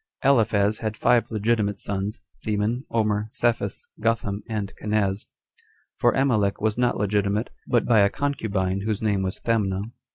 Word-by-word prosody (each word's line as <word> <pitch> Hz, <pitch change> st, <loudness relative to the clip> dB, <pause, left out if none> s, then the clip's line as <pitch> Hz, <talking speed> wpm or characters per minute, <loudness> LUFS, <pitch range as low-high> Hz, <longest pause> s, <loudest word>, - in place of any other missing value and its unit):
Aliphaz 110 Hz, -6 st, +3 dB
had 110 Hz, -1 st, -3 dB
five 120 Hz, -1 st, +3 dB
legitimate 105 Hz, -2 st, 0 dB
sons; 100 Hz, +1 st, -3 dB, 0.2 s
Theman, 110 Hz, +4 st, -1 dB
Omer, 105 Hz, -2 st, 0 dB
Saphus, 115 Hz, -3 st, -1 dB
Gotham, 105 Hz, -2 st, 0 dB
and 105 Hz, -3 st, -3 dB
Kanaz; 105 Hz, -2 st, 0 dB, 0.7 s
for 120 Hz, -, +4 dB
Amalek 110 Hz, -7 st, +2 dB
was 110 Hz, 0 st, +1 dB
not 125 Hz, 0 st, +1 dB
legitimate, 105 Hz, +1 st, 0 dB, 0.2 s
but 120 Hz, -2 st, +2 dB
by 115 Hz, -3 st, +4 dB
a 100 Hz, 0 st, +5 dB
concubine, 100 Hz, -9 st, -1 dB
whose 105 Hz, 0 st, -2 dB
name 100 Hz, -3 st, +1 dB
was 95 Hz, 0 st, -3 dB
Thamna. 100 Hz, -4 st, 0 dB
105 Hz, 140 wpm, -24 LUFS, 100-115 Hz, 0.7 s, a